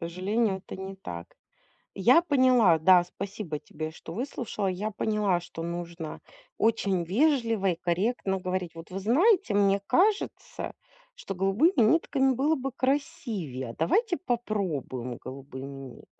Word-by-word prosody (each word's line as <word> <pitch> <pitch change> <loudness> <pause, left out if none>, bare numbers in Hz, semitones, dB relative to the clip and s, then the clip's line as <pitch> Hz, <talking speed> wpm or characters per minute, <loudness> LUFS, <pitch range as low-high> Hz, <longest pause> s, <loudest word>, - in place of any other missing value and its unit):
сожалению, 190 +5 0
это - - -7
не 190 0 -6
так. 85 - -8 0.7
Я 250 - +5
поняла. 255 - +4
Да, 175 +2 +6
спасибо 185 -3 -6
тебе, 155 +1 -6
что 160 +1 -10
выслушала. 235 -5 -3
Я 200 +4 -2
поняла, 205 -4 0
что 170 -1 -8
нужно 170 -1 -5 0.4
очень 200 -5 +1
вежливо 230 - +2
и 170 - -2
корректно 190 +3 0
говорить: 185 -2 -3
"Вот 165 +2 -11
вы 190 - -4
знаете, 290 - +3
мне 200 -1 +3
кажется, 405 - 0 0.4
что 340 - -6
голубыми 210 - +2
нитками 270 +1 +3
было 285 +6 +2
бы 270 -2 -4
красивее. 250 - -2
А - - -8
давайте 355 - +1
попробуем 180 - -3
голубыми 135 0 -8
нитками? 135 -2 -10
195 Hz, 135 wpm, -28 LUFS, 170-250 Hz, 0.7 s, Да